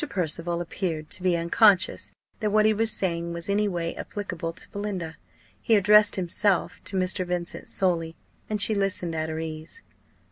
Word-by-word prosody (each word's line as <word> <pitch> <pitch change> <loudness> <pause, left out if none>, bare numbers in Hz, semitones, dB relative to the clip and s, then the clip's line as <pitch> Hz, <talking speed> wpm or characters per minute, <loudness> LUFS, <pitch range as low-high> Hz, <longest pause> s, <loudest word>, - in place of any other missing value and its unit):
Percival 170 - -1
appeared 165 -3 -4
to - - +2
be 180 -2 +2
unconscious 185 +3 +3 0.3
that 215 - 0
what 215 +1 +3
he 215 - +4
was 225 +1 +1
saying 170 -4 -1
was 170 0 -6
any 205 +1 +1
way 170 -3 -2
applicable 175 -5 -5
to 165 - -8
Belinda. 195 -6 -4 0.5
He 225 - +3
addressed 210 +1 +5
himself 190 +1 0
to 195 - 0
Mr. 185 0 0
Vincent 175 -1 -4
solely, 165 -3 0 0.3
and 215 -1 -1
she 215 - +6
listened 195 -4 0
at 160 0 -2
her 160 - -4
ease. 160 - -6
180 Hz, 170 wpm, -26 LUFS, 170-205 Hz, 0.5 s, she